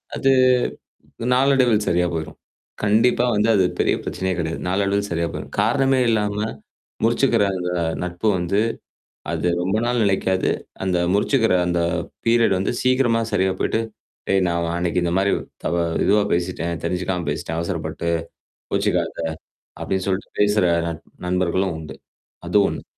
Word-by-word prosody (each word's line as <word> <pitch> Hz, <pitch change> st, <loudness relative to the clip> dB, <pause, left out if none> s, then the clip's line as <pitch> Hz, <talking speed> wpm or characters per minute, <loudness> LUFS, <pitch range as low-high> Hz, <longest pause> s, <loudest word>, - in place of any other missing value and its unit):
அது 135 Hz, -, +1 dB, 1.1 s
நாளடைவில் 130 Hz, -5 st, +3 dB
சரியா 90 Hz, 0 st, +2 dB
போயிடும். 80 Hz, -2 st, -5 dB, 0.4 s
கண்டிப்பா 115 Hz, +4 st, +3 dB
வந்து 105 Hz, +2 st, +2 dB
அது 95 Hz, -3 st, +4 dB
பெரிய -, -, +2 dB
பிரச்சனையே 95 Hz, 0 st, -2 dB
கிடையாது. 80 Hz, -1 st, -2 dB
நாளடைவில் 100 Hz, +2 st, 0 dB
சரியா 85 Hz, 0 st, 0 dB
போயிடும். -, -, -7 dB
காரணமே 135 Hz, -2 st, +2 dB
இல்லாம, 105 Hz, -2 st, +1 dB, 0.7 s
முறிச்சுக்கிற 115 Hz, -1 st, +3 dB
அந்த 90 Hz, 0 st, -3 dB, 0.3 s
நட்பு 90 Hz, +4 st, -2 dB
வந்து, 95 Hz, +4 st, 0 dB, 0.7 s
அது -, -, -1 dB
ரொம்ப 95 Hz, +3 st, 0 dB
நாள் 120 Hz, 0 st, +1 dB
நிலைக்காது. 95 Hz, -1 st, +1 dB, 0.3 s
அந்த 90 Hz, -1 st, +1 dB, 0.2 s
முறிச்சுக்கிற 115 Hz, 0 st, +2 dB
அந்த 85 Hz, 0 st, 0 dB, 0.5 s
பீரியட் 115 Hz, -4 st, +4 dB
வந்து, 95 Hz, -, -1 dB
சீக்கிரமா 125 Hz, -3 st, +2 dB
சரியா 95 Hz, -2 st, +2 dB
போயி்ட்டு, 110 Hz, -, +1 dB, 0.5 s
"டேய்! 95 Hz, -1 st, +3 dB
நான் 85 Hz, -1 st, -1 dB
அன்னைக்கு 90 Hz, 0 st, 0 dB
இந்த 85 Hz, -, 0 dB
மாதிரி 100 Hz, +1 st, +2 dB, 0.3 s
த -, -, -2 dB, 0.4 s
இதுவா 105 Hz, +1 st, +4 dB
பேசிட்டேன். 85 Hz, -2 st, -2 dB
தெரிஞ்சுக்காம 90 Hz, -1 st, -2 dB
பேசிட்டேன். 80 Hz, +2 st, -3 dB
அவசரப்பட்டு. 85 Hz, 0 st, -3 dB, 0.6 s
கோபப்படாதே!" 85 Hz, -, 0 dB, 0.6 s
அப்படின்னு 95 Hz, -1 st, -2 dB
சொல்லிட்டு 95 Hz, 0 st, -2 dB
பேசுற 105 Hz, -1 st, +3 dB, 0.2 s
நட 85 Hz, -1 st, -3 dB, 0.3 s
நண்பர்களும் 90 Hz, 0 st, 0 dB
உண்டு. 75 Hz, -4 st, -8 dB, 0.5 s
அது -, -, +2 dB
ஒண்ணு. -, -, -6 dB
95 Hz, 135 wpm, -22 LUFS, 90-110 Hz, 1.1 s, அது